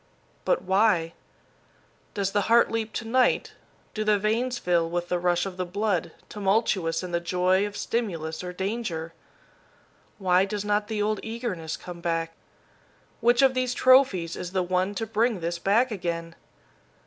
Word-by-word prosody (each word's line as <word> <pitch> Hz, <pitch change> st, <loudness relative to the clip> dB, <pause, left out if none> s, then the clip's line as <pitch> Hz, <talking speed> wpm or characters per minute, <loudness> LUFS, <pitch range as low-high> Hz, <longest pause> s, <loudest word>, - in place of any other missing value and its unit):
But -, -, +1 dB
why? 190 Hz, -4 st, +2 dB, 1.0 s
Does 195 Hz, -1 st, -1 dB
the 205 Hz, -, +1 dB
heart 235 Hz, +1 st, +5 dB
leap 225 Hz, -1 st, -2 dB
to -, -, -4 dB
night, 255 Hz, +2 st, +2 dB, 0.4 s
do 215 Hz, -, -2 dB
the 210 Hz, -1 st, +3 dB
veins 230 Hz, +5 st, 0 dB
fill 170 Hz, -2 st, +1 dB
with 175 Hz, 0 st, -3 dB
the 180 Hz, -, 0 dB
rush 175 Hz, 0 st, +1 dB
of 190 Hz, -2 st, -6 dB
the 185 Hz, -, -1 dB
blood, 180 Hz, -2 st, -1 dB, 0.2 s
tumultuous 195 Hz, -5 st, 0 dB
in 180 Hz, -, -6 dB
the 170 Hz, -, +1 dB
joy 185 Hz, +3 st, +1 dB
of 205 Hz, -, -8 dB
stimulus 165 Hz, -9 st, -3 dB
or 180 Hz, -, -5 dB
danger? 190 Hz, -4 st, -4 dB, 1.0 s
Why 185 Hz, -2 st, +3 dB
does 205 Hz, 0 st, -4 dB
not 210 Hz, 0 st, +1 dB
the 215 Hz, -2 st, -1 dB
old 215 Hz, 0 st, 0 dB
eagerness 220 Hz, -9 st, -4 dB
come 175 Hz, -1 st, -9 dB
back? 165 Hz, -1 st, -1 dB, 0.9 s
Which 240 Hz, +3 st, +4 dB
of 265 Hz, -1 st, +5 dB
these 255 Hz, -1 st, -1 dB
trophies 255 Hz, -10 st, +4 dB
is 180 Hz, +1 st, -6 dB
the 185 Hz, -1 st, +1 dB
one 185 Hz, +3 st, 0 dB
to 225 Hz, -, -2 dB
bring 225 Hz, 0 st, 0 dB
this 170 Hz, +1 st, -3 dB
back 225 Hz, +8 st, +2 dB
again? 170 Hz, -4 st, -4 dB
195 Hz, 160 wpm, -26 LUFS, 175-220 Hz, 1.0 s, heart